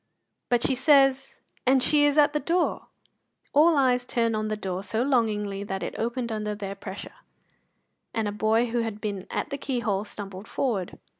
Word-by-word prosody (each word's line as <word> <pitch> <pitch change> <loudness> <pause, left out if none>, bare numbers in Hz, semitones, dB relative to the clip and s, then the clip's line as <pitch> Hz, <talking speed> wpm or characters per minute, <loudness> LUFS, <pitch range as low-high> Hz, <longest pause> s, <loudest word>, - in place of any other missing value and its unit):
"But 240 -1 +2
she - - +2
says 270 0 +3 0.2
and 260 0 +3
she 295 -1 +4
is 290 0 +2
at 295 0 +5
the 300 - +1
door!" 340 +5 0 0.7
All 310 +2 +5
eyes 250 -2 +3
turned 230 -2 0
on 215 0 -1
the 215 0 -2
door 190 -2 -4
so 220 +4 -1
longingly 210 -6 0
that 195 -1 -4
it - - -4
opened 235 +1 -2
under 210 -1 -2
their 200 -1 -5
pressure, 195 0 -8 1.0
and 225 -2 -1
a - - -1
boy 220 +3 +1
who 240 - 0
had 225 -2 -3
been 205 -3 -4
at - - -3
the 280 - -3
keyhole 230 -7 -1
stumbled 200 -1 -8
forward. 210 -10 -2
230 Hz, 180 wpm, -26 LUFS, 205-265 Hz, 1.0 s, at